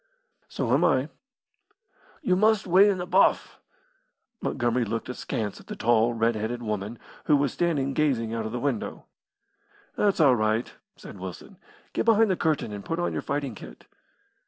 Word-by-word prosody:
"So - - -1
am - - +3
I." - - +2 1.1
"You 185 - +2
must 215 +1 +3
weigh 190 +3 +6
in 195 - +1
the 175 - -4
buff." 185 +2 +2 0.8
Montgomery 120 -1 0
looked 115 +2 -4
askance 115 -4 -4
at - - -17
the - - -6
tall, 120 0 +2
red 115 +1 +2
headed 115 +3 -3
woman 105 +1 -4 0.3
who 150 - +4
was 140 -2 0
standing 145 -6 0
gazing 130 -7 0
out 115 -1 -2
of - - -7
the 120 - -3
window. 135 -4 -3 0.9
"That's 205 -3 +1
all 140 -5 +6
right," 110 +1 0 0.2
said 100 - -11
Wilson. 95 -1 -9 0.3
"Get - - -1
behind 225 -2 +4
the - - +2
curtain 155 -10 -1
and 100 -1 -7
put 165 - -3
on 175 - -1
your - - -2
fighting 140 -3 -3
kit." - - -12
125 Hz, 170 wpm, -26 LUFS, 115-170 Hz, 1.1 s, weigh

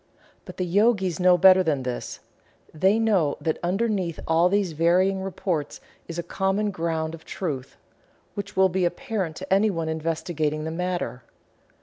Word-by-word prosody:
But - - -10
the 185 - -1
Yogis 190 -2 +2
know 180 0 +5
better 185 +1 +7
than 150 -7 0
this. 125 -1 -5 0.5
They 190 +7 +3
know 200 -10 +2
that 160 -2 -2
underneath 190 -2 -1
all 165 +2 +4
these 200 -2 +1
varying 180 +4 +2
reports 180 -5 -3
there - - -27 0.2
is 170 - -6
a 170 - -2
common 195 +4 -1
ground 165 -2 -2
of 165 -1 -10
truth, 140 -8 -5 0.6
which 200 -1 -7
will 190 0 +6
be 185 +1 -1
apparent 190 - -2
to 190 +2 -3
anyone 190 -5 +1
investigating 160 -1 -2
the 160 - -3
matter. 175 -8 -3
180 Hz, 155 wpm, -25 LUFS, 160-195 Hz, 0.6 s, better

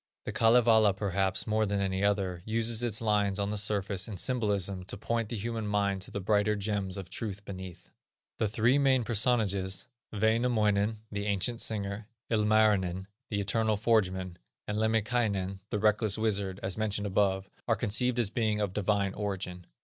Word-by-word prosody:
The - - -3
Kalevala, 110 -2 +5
perhaps, 95 -1 -1
more 110 0 +1
than 100 0 -1
any 95 0 -1
other, 95 -4 0
uses 115 +1 +1
its 115 -3 -1
lines 105 -2 +1
on 100 0 -1
the - - -2
surface 100 -2 -1
in 105 -4 -6
symbolism 100 -3 -1
to - - -4
point 115 +1 -2
the 115 - -3
human 115 0 -3
mind 100 -2 0
to - - -5
the - - -4
brighter 105 +2 +2
gems 100 -2 -2
of 95 -2 -7
truth 100 0 -5
beneath. 95 -3 -9 0.5
The 110 - +2
three 115 +6 +2
main 135 -3 +3
personages, 105 -5 +1 0.3
Wainamoinen, 110 -1 +2
the 100 0 -3
ancient 105 +4 0
singer, 105 -1 -3 0.2
Ilmarinen, 105 -4 +2 0.2
the 105 - -1
eternal 110 +2 +1
forgeman, 95 -5 +1 0.3
and 105 +1 -2
Lemminkainen, 110 -3 0
the - - -1
reckless 105 0 +2
wizard, 100 -3 -1
as 95 +3 -3
mentioned 105 -1 -1
above, 95 -1 +1 0.2
are - - +3
conceived 125 +4 0
as 115 -4 +1
being 110 -3 0
of 100 -3 -1
divine 100 -1 0
origin. 95 -3 -4
105 Hz, 165 wpm, -30 LUFS, 100-110 Hz, 0.5 s, Kalevala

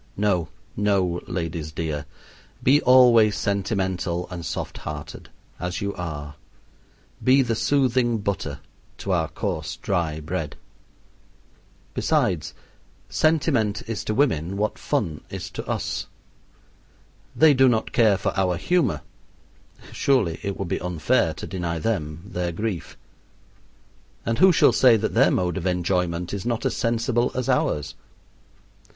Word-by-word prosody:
No, 95 -6 +1 0.3
no, 95 -4 +1
ladies 80 -3 -4
dear, 75 -2 -4 0.6
be 145 +4 +5
always 120 -4 +6
sentimental 95 -3 -1
and 85 -2 -6
soft - - -4
hearted, 75 -1 -7 0.3
as 90 0 -3
you 100 0 -2
are 75 -4 -6 0.9
be 135 +1 +5
the 120 -2 -1
soothing 125 -1 +2
butter 100 -2 -3 0.4
to 100 - -4
our 85 -3 +1
coarse 80 -2 -4
dry 85 -5 -1
bread. 80 -1 -4 1.4
Besides, 85 -5 0 0.5
sentiment 140 -10 +1
is 115 -2 -4
to 110 - -1
women 95 - +1
what 105 +1 -1
fun 75 -3 -1
is - - -6
to - - -5
us. - - -2 1.3
They 155 -1 +6
do 130 -1 +5
not 110 -2 0
care 110 -5 +4
for - - -2
our 95 -2 +1
humor, 175 - +1 0.9
surely 115 -12 +1
it 100 -1 -3
would 100 - -3
be - - -2
unfair 85 -3 +1
to - - -7
deny 85 -3 -3
them 80 -4 -2
their 90 -4 -3
grief. 95 0 -4 1.3
And 115 0 -1
who 190 0 +7
shall - - +5
say 125 -3 +6
that 110 +1 -2
their - - +5
mode 90 0 0
of 95 0 -2
enjoyment 90 -1 -1
is 100 - -3
not 120 -1 -2
as - - 0
sensible 120 +1 +1
as 130 -1 -2
ours? 75 0 0
95 Hz, 135 wpm, -24 LUFS, 85-115 Hz, 1.4 s, who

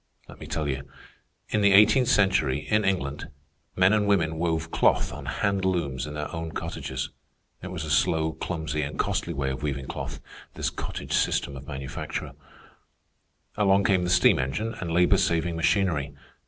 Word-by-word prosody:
Let - - -13
me - - -9
tell 75 -2 -2
you. 70 0 -4 0.6
In 105 - +1
the 100 -1 +5
eighteenth 110 +5 +6
century, 95 - +2
in 105 0 +3
England, 85 -7 -1 0.5
men 95 +2 +4
and 105 -1 +2
women 80 -6 +1
wove 80 -1 -1
cloth - - +2
on - - -8
hand 100 -1 0
looms 75 -8 -1
in 75 - -7
their 75 +2 -5
own 80 -1 -5
cottages. 65 0 -4 0.5
It 95 - -6
was 90 -4 -5
a 75 - -4
slow, 80 +4 +2
clumsy, 80 -2 -3
and 75 +1 -4
costly - - -1
way 65 -1 -1
of 65 - -5
weaving 70 -2 -3
cloth, - - -5 0.4
this - - -1
cottage - - -5
system 70 - +1
of 65 +1 -10
manufacture. 70 -1 -5 1.2
Along 100 -1 +3
came 95 -2 +2
the 90 - -1
steam 90 0 +5
engine 105 - -2
and 90 - -4
labor 90 +3 +4
saving 85 -3 +1
machinery. 80 -4 +1
80 Hz, 170 wpm, -26 LUFS, 75-95 Hz, 1.2 s, eighteenth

